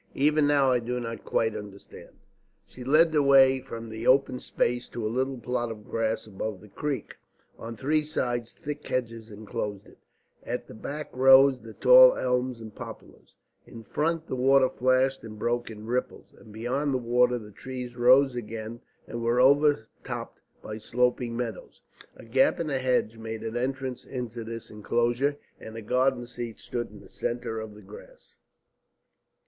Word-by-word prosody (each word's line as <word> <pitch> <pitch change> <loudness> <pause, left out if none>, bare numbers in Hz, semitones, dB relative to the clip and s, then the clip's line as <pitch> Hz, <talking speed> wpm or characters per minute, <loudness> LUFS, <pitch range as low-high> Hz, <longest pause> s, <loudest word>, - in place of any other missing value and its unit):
Even 150 +1 +3
now 140 -2 +4
I 125 - +3
do 125 +1 -3
not 115 -2 -6
quite 110 -1 0
understand." 100 -1 -10 0.6
She 125 - -11
led 155 +5 +5
the 150 -2 +3
way 135 -1 +6
from 115 -3 -8
that 110 +1 -6
open 130 -1 +4
space 120 0 -1
to 115 - -5
a - - +1
little 130 +4 -1
plot 120 0 -2
of 105 -2 -9
grass 115 0 -1
above 105 -1 -5
the 105 - -15
creek. 140 0 -4 0.4
On 115 +1 -7
three 150 +7 +1
sides 120 -6 -2
thick 150 -2 -7
hedges 115 -3 -3
enclosed 105 -1 -5
it, - - -19 0.4
at - - -4
the - - -12
back 145 +7 -7
rose 135 0 +6
the 110 -1 -11
tall - - +8
elms 125 -1 -1
and 110 -2 -10
poplars, - - -11 0.3
in 115 - -11
front 160 +8 -1
the 130 - -4
water 130 +1 +4
flashed 130 +1 +1
and 110 -1 -9
broke 120 +2 -1
in 110 -1 -9
ripples, 125 +2 -3
and 110 - -16
beyond 130 +6 -1
the - - +3
water 125 0 +2
the 105 -3 -10
trees 125 +2 -7
rose 130 +2 +5
again 115 0 -6 0.3
and 120 - -5
were 120 +1 +1
overtopped 140 -2 +1 0.2
by 110 0 -6
sloping 125 +1 0
meadows. 120 -2 -5 0.4
A - - -13
gap 125 +4 +3
in 170 - -1
the 140 -3 -1
hedge 125 -3 0
made 110 0 -6
an 115 +1 -4
entrance 130 0 -3
into 120 -3 -6
this 115 0 -8
enclosure, 120 +6 0 0.2
and 110 +1 -9
a - - -5
garden 125 +2 +1
seat 120 -2 -7
stood 120 -1 -4
in - - -13
the - - -15
centre 120 -2 -3
of 110 -1 -8
the 105 - -14
grass. - - -14
125 Hz, 175 wpm, -27 LUFS, 115-135 Hz, 0.6 s, tall